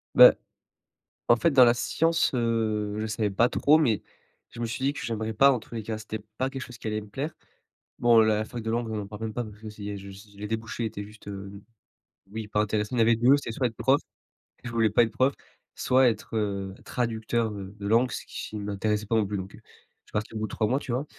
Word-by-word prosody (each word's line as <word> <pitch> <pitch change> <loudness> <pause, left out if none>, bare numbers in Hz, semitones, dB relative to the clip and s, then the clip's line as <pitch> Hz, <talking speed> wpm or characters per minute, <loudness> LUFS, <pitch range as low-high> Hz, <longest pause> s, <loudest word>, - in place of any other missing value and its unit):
Beh, - - +11 1.0
en - - +7
fait 145 +8 +2
dans 130 -4 +7
la 120 0 +5
science, 165 +7 +1
heu, 110 -3 0
je 110 - -1
savais 110 -1 -1
pas 115 +5 +4
trop, 150 +4 +4
mais 120 -9 +2 0.5
je 120 - -10
me 120 - 0
suis 115 +3 -4
dit 140 - +2
que - - -7
j'aimerais 110 -1 -2
pas, 135 +6 +6
en 130 - +1
tous 115 - -13
les 115 - -3
cas, 110 +1 -4
que - - -9
c'était 110 0 -5 0.2
pas 130 +1 0
quelque 135 -1 -6
chose 125 -2 -9
qui - - -9
allait 105 0 -1
me 105 - -12
plaire. 140 +9 -4 0.7
Bon 120 -2 +6
la 110 -1 +3
fac 120 +1 -7
de 110 - -2
langue, 115 0 -1
on 110 -1 -2
en 100 - -6
parle 105 +1 -9
même 110 -1 -4
pas 120 - -1
parce 105 -1 -11
que 110 - -8
si 105 -1 -6
je 100 +1 -12
les 105 - -5
débouchés 115 +1 -3
étaient 105 -2 -5
juste, 105 +1 -15
heu 100 0 -8 0.7
oui 110 0 -5
pas 105 0 +1
intéressantes. 105 +1 -1
Il 125 - 0
y - - +5
avait, 115 +1 +5
les - - 0
2 125 +4 +6
c'était 140 - -5
soit 130 - -1
être 115 - -9
prof, 135 +5 +3 0.6
je 120 - -5
voulais 115 -2 +3
pas 120 - +5
être 115 - -2
prof, 130 +4 +2 0.4
soit 130 0 +4
être, 115 0 -5
heu, 100 -2 -2
traducteur 115 -1 -1
heu 100 -1 -8
de 100 - -6
langue, 115 +4 +4
ce - - -5
qui 110 - -6
m'intéressait 105 +1 -1
pas 115 - +1
non 110 -2 +3
plus. 105 +1 -3
Donc 95 +1 -7
heu, - - -16
je - - -29 0.4
suis - - -21
parti 105 +1 -2
au - - -2
bout 110 - -2
de - - -14
3 110 - +1
mois, 130 +5 +1
tu 135 - -6
vois, 130 +4 -1
110 Hz, 265 wpm, -27 LUFS, 105-120 Hz, 1.0 s, Beh